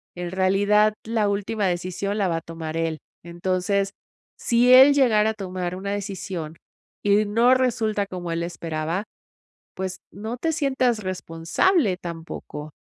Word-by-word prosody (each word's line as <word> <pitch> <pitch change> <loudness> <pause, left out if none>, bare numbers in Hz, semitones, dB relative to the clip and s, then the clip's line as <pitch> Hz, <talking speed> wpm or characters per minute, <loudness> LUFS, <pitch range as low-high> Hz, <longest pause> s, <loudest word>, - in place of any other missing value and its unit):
En 175 -1 -5
realidad, 200 +3 +3
la 220 -2 +1
última 200 +1 -1
decisión 185 +3 -2
la 200 -3 +1
va 165 - 0
a - - -4
tomar 160 -1 -7
él. 165 -1 -1 0.2
Entonces, 185 +3 -1 0.5
si 240 +1 +3
él 265 +3 +9
llegara 220 -6 +3
a - - -6
tomar 185 -3 -4
una 195 +2 -5
decisión 190 -5 -5 0.5
y 205 +1 +3
no 230 +5 +4
resulta 220 -5 0
como 180 -2 -5
él 165 0 -1
esperaba, 165 +1 -3 0.7
pues, 190 0 -4
no 220 +4 -5
te 325 - 0
sientas 265 -6 +1
responsable 185 - +1
tampoco. 165 -3 -7
195 Hz, 140 wpm, -24 LUFS, 175-220 Hz, 0.7 s, él